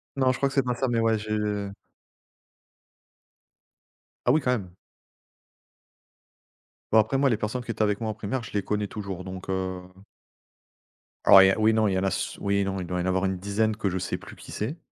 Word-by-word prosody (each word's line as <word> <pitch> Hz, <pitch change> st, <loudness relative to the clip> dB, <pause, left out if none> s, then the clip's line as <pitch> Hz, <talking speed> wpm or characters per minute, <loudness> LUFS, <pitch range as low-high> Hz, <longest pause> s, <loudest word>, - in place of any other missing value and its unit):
Non, 130 Hz, -1 st, +3 dB
je 130 Hz, -, -3 dB
crois 140 Hz, -, +1 dB
que 135 Hz, -, -9 dB
c'est 135 Hz, -, +3 dB
pas 125 Hz, -1 st, -1 dB
ça, 130 Hz, +1 st, -1 dB
mais 120 Hz, -1 st, +1 dB
ouais, 115 Hz, -1 st, +2 dB
j'ai, 105 Hz, 0 st, -6 dB
heu 105 Hz, -2 st, -1 dB, 2.5 s
Ah -, -, +5 dB
oui, 155 Hz, -, +3 dB
quand 125 Hz, -, +1 dB
même. 95 Hz, -7 st, -3 dB, 2.2 s
Bon, 110 Hz, -, +6 dB
après, 110 Hz, +6 st, +2 dB
moi, 140 Hz, 0 st, +3 dB
les 115 Hz, -, +2 dB
personnes 110 Hz, +4 st, -3 dB
qui 115 Hz, -, -3 dB
étaient 110 Hz, -, -4 dB
avec 105 Hz, 0 st, +1 dB
moi 110 Hz, -1 st, -2 dB
en -, -, -2 dB
primaire, 110 Hz, +4 st, -4 dB
je 105 Hz, -, -10 dB
les 100 Hz, -, 0 dB
connais 105 Hz, +1 st, -1 dB
toujours, 95 Hz, -3 st, -6 dB
donc 95 Hz, 0 st, -8 dB
heu 95 Hz, -1 st, -2 dB, 1.4 s
Ah -, -, +8 dB
ouais 95 Hz, 0 st, +10 dB
il -, -, +6 dB
y -, -, +5 dB
a, 105 Hz, -, -1 dB
oui, 110 Hz, +1 st, +4 dB
non 110 Hz, -1 st, +3 dB
il 95 Hz, -, +1 dB
y -, -, +1 dB
en -, -, -2 dB
a -, -, +2 dB
s 95 Hz, -, -2 dB
oui, 100 Hz, 0 st, +1 dB
non, 95 Hz, 0 st, -2 dB
il 90 Hz, -, -4 dB
doit 90 Hz, 0 st, -2 dB
y -, -, 0 dB
en -, -, -3 dB
avoir 95 Hz, +1 st, +1 dB
une 95 Hz, -1 st, -1 dB
dizaine 105 Hz, +3 st, 0 dB
que 105 Hz, -2 st, -1 dB
je 90 Hz, -, -2 dB
sais 95 Hz, -, -3 dB
plus -, -, -12 dB
qui -, -, -12 dB
c'est. 130 Hz, +11 st, -3 dB
105 Hz, 235 wpm, -26 LUFS, 95-115 Hz, 2.5 s, ouais